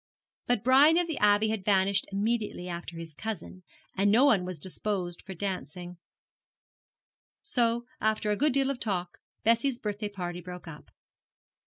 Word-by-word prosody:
But 245 -3 +1
Brian 280 +6 +6
of 350 - +3
the 325 -3 -4
Abbey 210 +1 +4
had 215 -3 -2
vanished 195 0 +2
immediately 210 -2 -1
after 170 -1 -6
his 165 -1 -8
cousin, 185 0 -6 0.3
and 200 +1 +3
no 240 +6 +6
one 210 -10 +4
was 180 -2 -5
disposed 180 +1 -3
for 190 - -9
dancing; 180 -1 -5 1.5
so, 240 - +1
after 215 0 +1
a - - +2
good 295 +7 +2
deal 275 0 +2
of 265 - -5
talk, 180 -6 -2 0.2
Bessie's 235 +3 +2
birthday 210 -2 -3
party 180 -3 -5
broke 180 0 -9
up. 150 -2 -11
205 Hz, 155 wpm, -29 LUFS, 180-235 Hz, 1.5 s, Brian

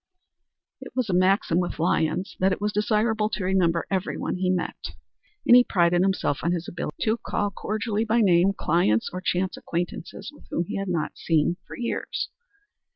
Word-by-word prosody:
It - - -10
was 250 -6 0
a - - 0
maxim 185 -1 +3
with 180 - -2
Lyons 170 +2 0
that 190 +1 +3
it - - -1
was 210 0 -1
desirable 215 +1 +1
to 210 - -3
remember 180 -3 +2
everyone 190 -1 -2
he 185 0 0
met, 185 -1 -3 0.5
and 240 - +8
he 250 - +8
prided 175 -4 +2
himself 190 -7 +1
on 170 - +1
his 175 -1 -3
ability 165 -3 -5
to 220 +1 +1
call 205 -2 -2
cordially 215 +2 -2
by 230 +1 +2
name 185 -1 +4
clients 115 -11 +1
or 185 - -4
chance 185 +2 -1
acquaintances 175 - -5 0.2
whom 170 - -1
he - - -4
had 195 -1 -3
not 170 -4 -2
seen 165 +1 +1
for - - -9
years. 240 -1 -3
185 Hz, 175 wpm, -25 LUFS, 175-210 Hz, 0.5 s, and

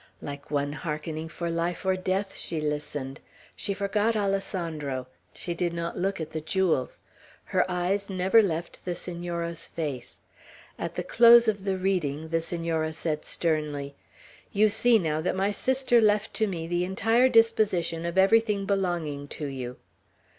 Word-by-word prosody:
Like 140 0 -8
one 145 0 -1
hearkening 155 +2 -4
for 170 +1 -4
life 170 +2 -2
or 190 0 +3
death, 190 +2 -2
she 165 - -2
listened. 150 -2 -3 0.4
She - - -4
forgot 205 +3 0
Alessandro. 170 -9 -2 0.3
She 175 - -5
did 170 0 -1
not 170 0 -3
look 195 +1 -1
at 160 - -5
the 160 - -4
jewels. 160 -5 0 0.4
Her 185 - 0
eyes 185 +3 -1
never 190 +4 +4
left 170 -4 -3
the 175 -1 -3
Senora's 170 -1 -4
face. 145 -7 -5 0.6
At - - -4
the - - -2
close 235 0 +7
of 200 -3 0
the 190 -1 0
reading, 160 -5 -1
the 165 0 +1
Senora 165 -1 -1
said 155 -1 -2
sternly, 150 -4 -1 0.6
"You 210 +1 +4
see, 230 +2 +5
now, 155 -5 -1
that 180 - -1
my 195 +2 +1
sister 255 +2 +2
left 210 0 +2
to 220 - +1
me 170 -4 -4
the 175 +1 0
entire 225 +7 +3
disposition 210 -8 +2
of 170 +2 -3
everything 205 +1 +4
belonging 175 -8 -1
to 150 - -6
you." 130 -3 -5
175 Hz, 155 wpm, -27 LUFS, 155-195 Hz, 0.6 s, close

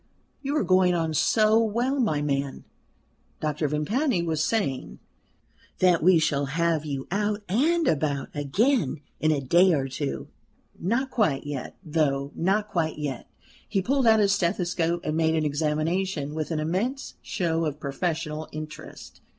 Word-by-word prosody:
"You 285 +2 -1
are - - +2
going 185 -1 +4
on 165 -2 -1
so 215 +7 +4
well, 240 +6 0
my 155 - +1
man," 140 -1 -2 0.8
Doctor 150 0 -1
Vimpany 180 - 0
was 160 -2 0
saying, 135 - -1 0.8
"That 180 -2 +4
we 180 +2 +6
shall 150 -3 +1
have 170 -2 +1
you 140 -3 -4
out 205 +1 -1
and 310 - +2
about 140 -2 0
again 155 - +1 0.2
in 155 - +2
a 150 - +1
day 175 +7 +4
or 135 -3 0
two. 135 +2 -4 0.5
Not 235 +9 0
quite 180 - +1
yet, 145 -3 -6
though 145 -4 0
not 200 +5 0
quite 165 -5 -1
yet," 145 -5 -5 0.4
he 195 - +1
pulled 265 +2 +2
out 220 -1 +6
his 200 -1 +4
stethoscope 175 -2 0
and 155 - -2
made 160 0 +2
an 155 -1 +1
examination 155 +2 -1
with 155 -1 -3
an 160 -2 -1
immense 200 - -2
show 170 -7 -1
of 150 -1 -3
professional 155 +1 -3
interest. 155 0 -9
165 Hz, 150 wpm, -26 LUFS, 150-205 Hz, 0.8 s, we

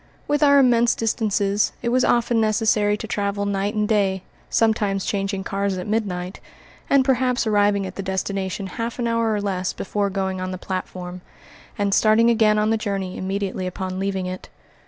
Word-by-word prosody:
With 295 +1 +1
our 285 -1 +6
immense 240 -3 +4
distances, 210 -2 0
it 235 - 0
was 255 +1 +2
often 235 -1 +2
necessary 215 -1 +2
to - - -6
travel 200 0 -1
night 200 +1 -1
and 210 -1 +1
day, 195 -3 +1 0.3
sometimes 210 -4 +1
changing 195 -1 -2
cars 200 -1 -2
at 180 - -5
midnight, 195 -4 -2 0.5
and 275 -2 +4
perhaps 255 -2 +1
arriving 205 -2 +2
at 185 - -8
the - - -2
destination 190 0 -3
half 230 +5 -4
an 240 - -2
hour 230 -1 +1
or 210 - 0
less 185 -2 -2
before 200 0 -2
going 190 -1 -2
on 185 - -3
the 185 - -4
platform, 180 -1 -5 0.6
and 200 -2 0
starting 225 +3 +4
again 215 -2 +3
on 210 +1 +2
the 225 - +2
journey 195 -3 -3
immediately 190 -1 -3
upon 185 0 -4
leaving 195 -1 -2
it. 185 0 -6
205 Hz, 180 wpm, -22 LUFS, 190-225 Hz, 0.6 s, our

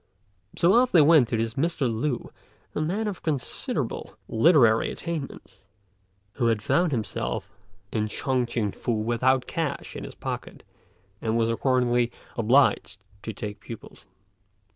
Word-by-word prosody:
So 175 +3 +4
off 250 +1 +4
they 170 - +7
went 150 -5 +6
to 115 - 0
this 115 0 -1
Mr. 150 +1 0
Lü, 120 +3 -2 0.4
a - - -2
man 195 +8 -1
of 200 -4 -4
considerable 145 -6 -3
literary 115 -3 +4
attainments, 145 - -6 0.7
who 120 - +2
had 110 -2 +1
found 175 +6 +2
himself 105 - -3 0.4
in 110 -1 0
Shun 125 +2 -1
t'ien 115 -4 -1
Fu 120 - -2
without 120 +4 +2
a - - -29
cash 160 -4 -3
in - - -6
his - - -9
pocket, - - -6 0.6
and 115 0 0
was 115 0 +2
accordingly 120 -1 +2 0.2
obliged 115 -4 +2 0.2
to 110 - -5
take 105 -1 -6
pupils. 115 +2 -11
120 Hz, 140 wpm, -26 LUFS, 115-150 Hz, 0.7 s, they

